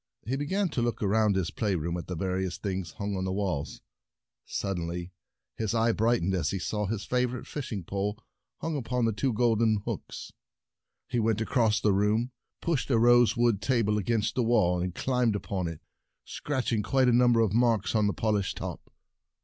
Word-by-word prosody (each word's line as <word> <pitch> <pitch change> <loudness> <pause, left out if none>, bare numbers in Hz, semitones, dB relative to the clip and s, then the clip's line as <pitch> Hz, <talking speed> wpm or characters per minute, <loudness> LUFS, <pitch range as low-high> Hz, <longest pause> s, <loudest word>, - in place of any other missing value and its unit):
He 125 +5 -1
began 185 +8 0
to 130 - -2
look 120 -2 -1
around 105 0 +3
his 95 -3 -1
play 105 -4 -1
room, 85 +1 -2
at 85 - -5
the 90 - -4
various 95 +1 -2
things 95 -5 -4
hung 100 -1 -3
on 95 - -2
the 95 - -1
walls. 95 -7 -2 0.7
Suddenly 90 -2 -3 0.5
his 110 0 -1
eye 115 +1 +3
brightened 110 -4 +1
as 85 -6 0
he 100 - -2
saw 105 +2 -2
his 105 0 -3
favor 125 0 0
ite - - -9
fishing 115 -10 -5
pole 100 +4 -2 0.4
hung 165 -1 -2
upon 125 -3 0
two 130 +6 0
golden 110 -2 +2
hooks. - - -6 0.7
He 120 -2 -1
went 110 -1 +1
across 110 -1 +2
the 105 - +2
room, 105 +5 +1 0.3
pushed 145 -10 -1
a 120 - +3
rosewood 120 -2 +4
table 110 -5 +1
against 110 +1 0
the 125 - 0
wall, 105 -7 +2
and 90 0 -3
climbed 125 -4 +1
up 100 - -6
on 95 -3 -1
it, 85 -2 -7 0.4
scratching 130 -6 -2
A - - +1
Fishing - - -7
and - - -8
the - - -11
Dragons - - -9
quite 130 -1 +4
a 120 - +4
number 120 -2 +4
of 110 -4 +1
marks 115 -3 +2
on 105 -2 +3
the 100 - 0
Bait - - -13
polished 105 -3 0
top. - - -7
110 Hz, 205 wpm, -28 LUFS, 95-120 Hz, 0.7 s, rosewood